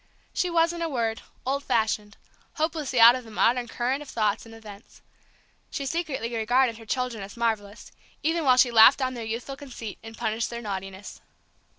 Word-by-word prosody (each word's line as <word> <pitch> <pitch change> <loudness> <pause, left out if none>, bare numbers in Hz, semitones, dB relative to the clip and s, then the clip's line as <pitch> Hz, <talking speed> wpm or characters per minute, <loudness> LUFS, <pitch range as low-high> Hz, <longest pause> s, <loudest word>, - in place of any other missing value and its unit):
She 360 - 0
was, 335 0 +2
in 340 - -6
a 330 - -1
word, 230 -5 -1 0.2
old 275 +2 -1
fashioned, 215 -3 -1 0.4
hopelessly 305 -5 -1
out 230 +1 +10
of 255 0 -4
the 225 - -13
modern 240 +3 +2
current 250 +5 -2
of 295 - -10
thoughts 215 0 -1
and 225 - -12
events. 210 -2 -14 0.7
She 280 -3 -4
secretly 270 -7 -3
regarded 235 +1 +2
her 225 - -13
children 250 -3 -2
as 195 +3 -9
marvellous, 220 -2 -2 0.3
even 325 +1 +1
while 255 -3 +5
she 250 -1 +5
laughed 230 +3 +8
down 260 -1 -1
their 235 -2 -6
youthful 235 +5 -5
conceit 245 -7 -8
and 225 0 -11
punished 220 +1 -1
their 235 - -5
naughtiness. 195 -1 -6
235 Hz, 185 wpm, -26 LUFS, 220-270 Hz, 0.7 s, out